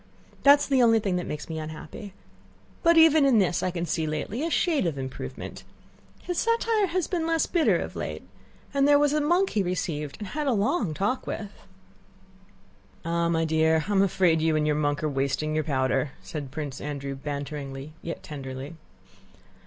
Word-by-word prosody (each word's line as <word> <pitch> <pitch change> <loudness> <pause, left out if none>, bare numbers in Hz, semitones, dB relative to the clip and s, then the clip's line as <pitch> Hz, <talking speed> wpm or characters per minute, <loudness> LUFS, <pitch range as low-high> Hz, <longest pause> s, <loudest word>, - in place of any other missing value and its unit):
That 280 +1 +8
is 285 - -2
the 270 -2 +3
only 225 -2 +5
thing 195 -4 -1
that 180 - -4
makes 150 0 -5
me 160 -1 -4
unhappy. 155 +5 -8 0.7
But 335 0 +4
even 320 -2 +7
in 270 -4 +5
this 185 -4 +2
I 185 - 0
can 175 -1 -3
see 160 -1 -1
lately 155 - -3
a 330 - 0
shade 315 - +1
of 155 -4 -3
improvement. 130 -1 -6 0.6
His 355 -2 -2
satire 460 -3 +2
has 360 -1 -1
been 335 -4 -2
less 330 -1 +2
bitter 340 -3 +2
of - - -5
late, - - -5 0.5
and 280 0 +3
there 290 0 +6
was 290 0 +3
a 305 - +2
monk 350 +6 +2
he 210 - +1
received 165 -5 -3
and 205 -3 -7
had 300 -1 -3
a 265 - +3
long 205 - 0
talk 205 - -1
with." 205 -2 -4 1.5
"Ah! 170 0 0
my 165 -1 +1
dear, 160 0 +2
I - - -2
am 195 -1 +4
afraid 175 -4 +3
you 160 0 +2
and 155 0 +1
your 150 -1 +2
monk 145 0 0
are - - +2
wasting 140 +2 -1
your 155 0 +1
powder," 135 -1 0
said 150 -5 -6
Prince 140 -1 -6
Andrew 140 -1 -4
banteringly 140 0 -6
yet 170 - -6
tenderly. 135 +1 -7
170 Hz, 190 wpm, -26 LUFS, -, 1.5 s, That